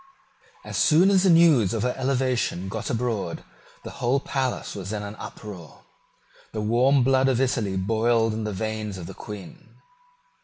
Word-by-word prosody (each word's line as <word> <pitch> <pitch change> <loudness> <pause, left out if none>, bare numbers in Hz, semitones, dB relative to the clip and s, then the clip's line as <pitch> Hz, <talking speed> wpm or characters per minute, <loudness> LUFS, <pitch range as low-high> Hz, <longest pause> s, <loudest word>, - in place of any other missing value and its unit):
As - - -3
soon 175 +5 +5
as 190 -2 +4
the 190 - +3
news 155 - +5
of 110 - -1
her 125 0 0
elevation 130 -8 -1
got 110 +1 -4
abroad, 115 -8 -2 0.4
the - - -7
whole 125 +3 0
palace 130 -2 -3
was 95 -1 -6
in 105 -1 -3
an 100 0 -6
uproar. 95 -7 -10 0.7
The 110 - -3
warm 125 +5 +3
blood 135 +1 +3
of 125 -2 +1
Italy 115 -7 0
boiled 115 +3 +1
in 110 0 -3
the 105 - -3
veins 110 0 -4
of 90 - -7
the - - -8
Queen. 105 -3 -11
115 Hz, 165 wpm, -25 LUFS, 105-130 Hz, 0.7 s, soon